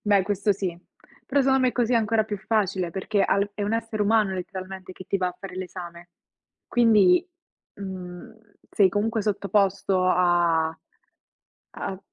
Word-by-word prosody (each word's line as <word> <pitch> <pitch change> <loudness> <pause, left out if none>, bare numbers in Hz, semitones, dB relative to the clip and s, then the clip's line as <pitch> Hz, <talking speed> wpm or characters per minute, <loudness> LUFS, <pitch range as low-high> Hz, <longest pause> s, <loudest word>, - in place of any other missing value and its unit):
Beh, 205 -2 +3
questo 205 +1 +1
sì. 185 -3 -4 0.5
Però 280 +1 +2
secon 265 0 +3
me 255 -1 +2
così 245 0 0
è - - +5
ancora 220 0 +2
più 210 -1 -4
facile, 195 -4 -1
perché 195 +3 -1
ha - - +2
l 200 +1 0
è 205 - -4
un 205 +2 -1
essere 225 -2 -1
umano 210 -2 +2
letteralmente 185 0 -7
che 185 - -11
ti - - 0
va 185 -1 0
a 180 - -9
fare 195 -2 -9
l'esame. 175 -2 -8 0.6
Quindi, 215 - +4 0.5
mhmm, 185 -1 -8 0.4
sei 200 -2 +4
comunque 215 +3 -1
sottoposto 200 -2 +1
a 170 -3 +2 1.0
a 190 -1 -4
195 Hz, 160 wpm, -25 LUFS, 185-215 Hz, 1.0 s, è